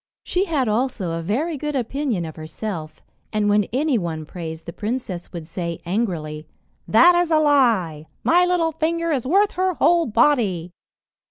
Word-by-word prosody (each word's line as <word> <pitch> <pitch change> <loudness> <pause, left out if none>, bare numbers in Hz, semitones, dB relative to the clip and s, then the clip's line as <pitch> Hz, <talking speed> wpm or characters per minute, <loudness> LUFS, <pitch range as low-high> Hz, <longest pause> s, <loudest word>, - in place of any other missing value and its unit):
She 370 +2 0
had 295 -9 0
also 215 -5 -1
a 165 0 -3
very 280 - -1
good 295 +1 -3
opinion 250 - -1
of 160 - -8
herself, 160 0 -6 0.3
and 215 -1 0
when 205 0 +3
any 270 0 0
one 160 -3 -4
praised 160 -1 -7
the 170 - -7
princess, 210 -5 -4
would 170 -3 -7
say 170 0 -5
angrily, 165 -6 -2 0.4
"That 340 +11 +6
is 350 -1 +2
a 315 - +4
lie! 230 - +2 0.2
My 350 +2 +4
little 355 -2 +1
finger 330 +1 -1
is 255 -4 -1
worth 395 +7 +3
her 370 -1 0
whole 340 +1 +3
body." 215 - +2
230 Hz, 165 wpm, -22 LUFS, -, 0.4 s, That